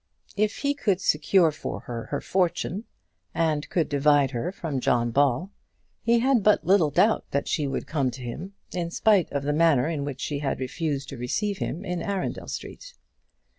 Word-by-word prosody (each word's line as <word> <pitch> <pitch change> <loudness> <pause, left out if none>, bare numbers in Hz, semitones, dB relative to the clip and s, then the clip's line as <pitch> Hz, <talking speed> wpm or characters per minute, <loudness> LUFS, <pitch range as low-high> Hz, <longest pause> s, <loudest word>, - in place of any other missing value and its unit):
If 215 +1 0
he 285 0 0
could 205 -10 0
secure 165 0 +3
for 150 - -6
her 115 -2 -6
her 145 - -2
fortune, 185 +2 -1 0.5
and 155 -3 0
could 165 -4 +1
divide 145 -1 +3
her 125 +8 -2
from 160 -8 -3
John 120 -1 +1
Ball, 140 - +2 0.5
he 235 +1 +3
had 260 -2 +3
but 210 +1 +3
little 185 -5 +4
doubt 185 +10 +3
that 140 - -1
she 150 -3 0
would 135 - -3
come 140 -5 0
to 125 +1 -8
him, 170 +11 -6 0.2
in 170 -2 -2
spite 200 0 +3
of 140 -1 -2
the 145 +1 0
manner 150 -4 +4
in 155 -4 -2
which 140 -2 -5
she 145 -2 -2
had 140 -2 -2
refused 140 +1 -3
to 135 - -7
receive 195 - -2
him 180 +6 -4
in 180 -2 -3
Arundel 195 0 -3
Street. - - -8
160 Hz, 185 wpm, -26 LUFS, 140-195 Hz, 0.5 s, little